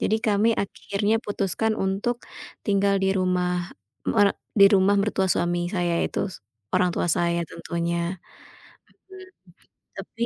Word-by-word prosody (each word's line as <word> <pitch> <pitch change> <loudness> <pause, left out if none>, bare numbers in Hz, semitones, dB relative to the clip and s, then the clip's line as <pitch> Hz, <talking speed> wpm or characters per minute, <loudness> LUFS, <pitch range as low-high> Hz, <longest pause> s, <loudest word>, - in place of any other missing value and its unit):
Jadi 220 +1 +1
kami 215 +1 +3
akhirnya 205 +2 -1
putuskan 205 +2 -1
untuk 200 +6 -1 0.4
tinggal 200 -1 +2
di 190 0 +2
rumah 180 -1 0 0.4
mere 205 -2 +3 0.2
di 200 0 +9
rumah 200 0 +4
mertua 195 -2 0
suami 175 0 0
saya, 175 -3 0
yaitu - - -1
s 165 - -12 0.3
orang 180 -1 +3
tua - - 0
saya 170 0 +1
tentunya. 170 +1 -3 0.9
Mhm. 375 0 -11 0.7
Tapi 235 - -4
195 Hz, 130 wpm, -24 LUFS, 175-205 Hz, 0.9 s, di